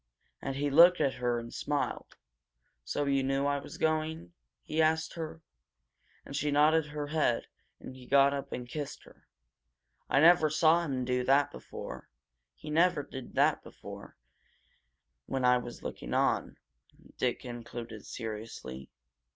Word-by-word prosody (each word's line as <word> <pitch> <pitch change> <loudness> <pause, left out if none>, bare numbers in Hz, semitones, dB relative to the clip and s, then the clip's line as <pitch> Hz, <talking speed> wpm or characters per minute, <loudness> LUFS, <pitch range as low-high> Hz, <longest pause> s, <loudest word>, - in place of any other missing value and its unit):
"And 135 - -3
he 145 +1 -1
looked 175 +5 +7
at 140 -3 +2
her, 120 -1 +1
and 115 0 -7
smiled. 145 -1 -3 0.7
'So 145 - -2
you 140 -1 +2
knew 135 +1 0
I 145 0 +1
was - - -10
going?' 155 - -1 0.3
he 160 - 0
asked 160 0 +2
her. 160 -1 -6 0.8
And 140 - -8
she 150 +1 0
nodded 150 +2 +4
her 150 0 -4
head, 150 -6 +1 0.3
and 130 - -10
he 125 -1 -13
got 140 0 +5
up 140 -1 -5
and 125 -1 -5
kissed 145 +3 -6
her. - - -20 0.8
I - - +4
never 160 0 +6
saw 160 +2 +4
him 130 -5 -2
do 125 0 0
that 140 +2 +4
before 65 - -9 0.5
he 155 - -9
never 165 -1 +3
did 130 -2 -9
that - - +3
before, - - -11 1.1
when 130 -1 -1
I 125 0 +5
was 120 -1 -9
looking - - -5
on," - - +1 0.6
Dick 125 -1 0
concluded 120 -3 -8
seriously. 105 - -7
140 Hz, 150 wpm, -30 LUFS, 125-155 Hz, 1.1 s, looked